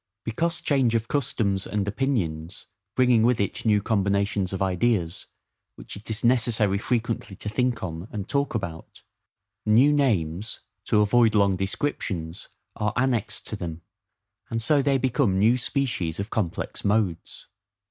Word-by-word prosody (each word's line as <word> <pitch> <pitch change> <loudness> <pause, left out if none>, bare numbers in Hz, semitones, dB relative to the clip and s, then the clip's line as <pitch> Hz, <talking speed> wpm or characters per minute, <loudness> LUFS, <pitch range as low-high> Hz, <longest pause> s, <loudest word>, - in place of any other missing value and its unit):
Because 165 +9 -1
change 130 -5 +2
of 115 0 0
customs 105 -8 0
and 105 -1 -2
opinions 95 - -2 0.3
bringing 125 -3 +4
with 120 +1 +3
it 100 +3 -2
new 105 -2 +3
combinations 100 -2 0
of 95 - -3
ideas, 95 -2 0 0.5
which - - -9
it 100 +3 -11
is 110 0 -3
necessary 115 -5 +2
frequently 115 -3 -2
to 105 - -7
think 120 +1 0
on 85 +1 -5
and 105 -2 -5
talk 140 -3 -1
about, 85 -7 -6 0.6
new 125 +8 +5
names, 105 - 0 0.2
to 105 -2 +3
avoid 110 +1 +4
long 100 -2 +4
descriptions, 95 - -3 0.3
are 105 -1 -1
annexed 125 -4 0
to - - -5
them; 85 -1 -6 0.7
and 115 - -1
so 140 +6 +3
they 135 0 +2
become 130 -6 +1
new 110 +5 +4
species 120 - -2
of 100 +3 -4
complex 95 -7 -3
modes. 100 -5 -1
105 Hz, 145 wpm, -25 LUFS, 95-120 Hz, 0.7 s, new